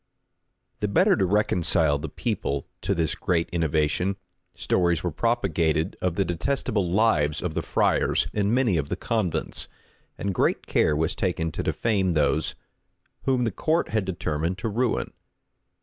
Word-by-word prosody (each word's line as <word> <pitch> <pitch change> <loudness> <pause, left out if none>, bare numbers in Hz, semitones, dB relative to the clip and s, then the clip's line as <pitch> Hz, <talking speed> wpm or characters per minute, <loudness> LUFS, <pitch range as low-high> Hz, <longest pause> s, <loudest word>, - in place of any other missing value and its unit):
The 105 - 0
better 100 - +4
to 95 - +1
reconcile 85 -6 +2
the 75 +1 -5
people 70 0 -2 0.2
to 100 +1 0
this 80 -2 0
great 90 -4 0
innovation, 80 +3 0 0.4
stories 85 -3 +1
were 90 - -1
propagated 85 -6 0
of 90 -2 0
the 100 - +1
detestable 95 +2 -1
lives 85 -7 +2
of 90 -3 -3
the - - -1
friars - - +1
in 105 0 +1
many 120 -7 +2
of 75 -2 -2
the - - -1
convents; 105 -3 -2 0.5
and 100 -1 -2
great - - +1
care 75 - +2
was 80 +1 0
taken 85 -3 -1
to - - -3
defame 95 -6 0
those 75 -2 +1 0.7
whom 130 -2 +2
the 115 - 0
court 160 - 0
had 110 -2 0
determined 85 -1 -2
to 110 - -3
ruin. 120 +3 -1
90 Hz, 150 wpm, -25 LUFS, 80-105 Hz, 0.7 s, better